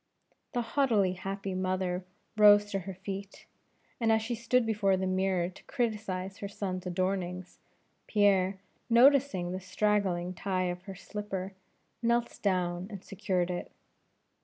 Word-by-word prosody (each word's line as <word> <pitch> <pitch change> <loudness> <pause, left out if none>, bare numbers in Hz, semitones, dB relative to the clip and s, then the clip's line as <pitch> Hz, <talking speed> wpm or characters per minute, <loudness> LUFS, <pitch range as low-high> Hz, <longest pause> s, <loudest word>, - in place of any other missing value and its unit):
The 245 - +1
haughtily 225 -7 +2
happy 195 +1 -4
mother 185 -1 -1 0.3
rose 205 -1 +7
to 195 - 0
her 190 +1 -6
feet, 195 +1 -7 0.5
and 225 -2 +3
as 220 0 +3
she 235 +2 -2
stood 235 +1 +2
before 205 -3 +2
the 190 - -1
mirror 185 -1 +1
to 185 - -15
criticize 205 -6 -2
her 200 - -4
son's 190 -2 -4
adornings, 185 0 -2 0.5
Pierre, 195 -2 +3 0.3
noticing 245 -7 +5
the 185 - -3
straggling 185 -2 0
tie 185 -1 -1
of 175 0 -7
her 195 -2 -7
slipper, 195 -1 -5 0.5
knelt 235 0 +1
down 180 -2 0
and 200 -3 -8
secured 185 -2 -1
it. 175 - -5
195 Hz, 135 wpm, -30 LUFS, 185-210 Hz, 0.5 s, rose